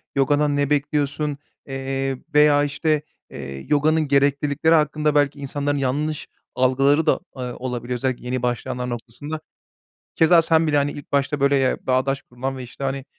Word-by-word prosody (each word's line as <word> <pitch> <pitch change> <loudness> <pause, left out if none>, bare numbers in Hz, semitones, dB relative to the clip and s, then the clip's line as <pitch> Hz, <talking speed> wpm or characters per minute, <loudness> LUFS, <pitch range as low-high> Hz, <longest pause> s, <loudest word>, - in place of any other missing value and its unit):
yogadan 145 +1 +2
ne 145 -1 +1
bekliyorsun, 150 0 0 0.3
eee, 135 0 -3 0.2
veya 150 -1 +5
işte, 150 +1 0 0.3
eee, 70 -1 -8
yoganın 155 +1 +2
gereklilikleri 140 +3 +2
hakkında 150 -1 +1
belki 145 -1 +2
insanların 145 +1 -2
yanlış 145 +3 -2 0.3
algıları 135 +4 +3
da, - - +5 0.2
eee, - - -5
olabiliyor, 125 0 -4
özellikle 125 0 -2
yeni 125 0 -2
başlayanlar 125 +1 -2
noktasında. 125 +6 -6 0.8
Keza 165 +1 +6
sen 165 0 +2
bile 150 -1 +2
hani 145 0 +1
ilk 145 - -10
başta 140 +1 0
böyle, 140 0 +3
eee, 130 -1 +1
bağdaş 130 +1 +1
kurulan 130 +2 -5
ve 130 - -6
işte 125 +3 -9
hani, 135 0 -2
140 Hz, 155 wpm, -22 LUFS, 130-150 Hz, 0.8 s, Keza